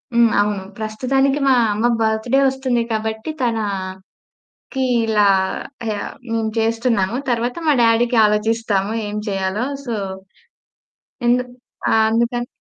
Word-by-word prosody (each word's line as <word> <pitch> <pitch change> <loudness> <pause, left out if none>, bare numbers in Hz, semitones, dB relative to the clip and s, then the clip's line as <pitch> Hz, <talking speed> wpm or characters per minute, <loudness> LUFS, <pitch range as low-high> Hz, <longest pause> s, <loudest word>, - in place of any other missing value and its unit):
హ్మ్. 235 -1 +5
అవును. 205 -2 -1 0.2
ప్రస్తుతానికి 270 +6 0
మా - - +6 0.2
అమ్మ 215 +3 -1 0.2
బర్త్‌డే 220 +4 +1
వస్తుంది 260 -3 0
కాబట్టి, 220 +3 -3
తనకీ 195 -5 -3 0.9
ఇలా 210 -2 +3 1.1
మేము 225 -1 0
చేస్తున్నాము, 225 -2 +1
తర్వాత 240 +1 -1
మా - - +6
డ్యాడీ‌కి 235 +1 +3
ఆలోచిస్తాము 210 -1 0 0.2
ఏం 205 - -5
చెయ్యాలో. 195 +3 -1 0.2
సో, 235 - -2 1.3
ఎందుక్ 250 0 +1 0.4
ఆహ్, 220 - +4
అందుకన్ 235 +1 0
225 Hz, 105 wpm, -20 LUFS, 210-240 Hz, 1.3 s, మా